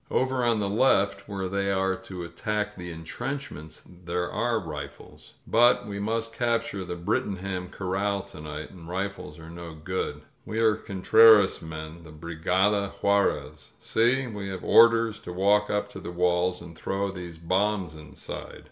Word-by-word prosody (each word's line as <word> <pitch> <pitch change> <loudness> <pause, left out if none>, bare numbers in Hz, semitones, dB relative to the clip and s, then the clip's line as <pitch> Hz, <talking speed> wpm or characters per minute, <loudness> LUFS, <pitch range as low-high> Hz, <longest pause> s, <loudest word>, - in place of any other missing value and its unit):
Over 130 -1 +1
on 115 -2 +3
the 100 - 0
left, 100 -3 +2
where 95 -2 -3
they 100 +1 -1
are 95 0 +1
to 90 -1 -8
attack 105 +4 -3
the 90 -1 -7
intrenchments, 80 - -6
there 90 0 -4
are 120 -1 0
rifles. 75 -5 -9
But 120 +2 +4
we 100 -1 -5
must 115 +2 -2
cap 120 -1 +1
ture 95 -1 -5
the 90 -1 -5
Brlttingham 90 +1 -2
Corral 100 +1 -1
to 100 -6 -11
night, 75 0 -7
and 85 -3 -12
rifles 95 -4 -4
are 80 0 -11
no 85 -1 -8
good. 90 +4 -4 0.2
We 110 - -5
are 110 -1 +4
Contreras' 110 0 +5
men, 80 +1 -8
the 80 - -12
Brigada 90 +6 0
Juarez. 75 -7 0
See, 125 +4 +2
we 105 -4 -5
have 95 -2 -5
orders 115 -1 +5
to 115 - -8
walk 100 +3 +3
up 105 0 0
to - - -9
the - - -7
walls 90 0 +1
and 85 -1 -11
throw 100 +3 -2
these 90 -3 -8
bombs 95 +1 0
inside!" 75 -3 -9
95 Hz, 165 wpm, -27 LUFS, 85-105 Hz, 0.2 s, Contreras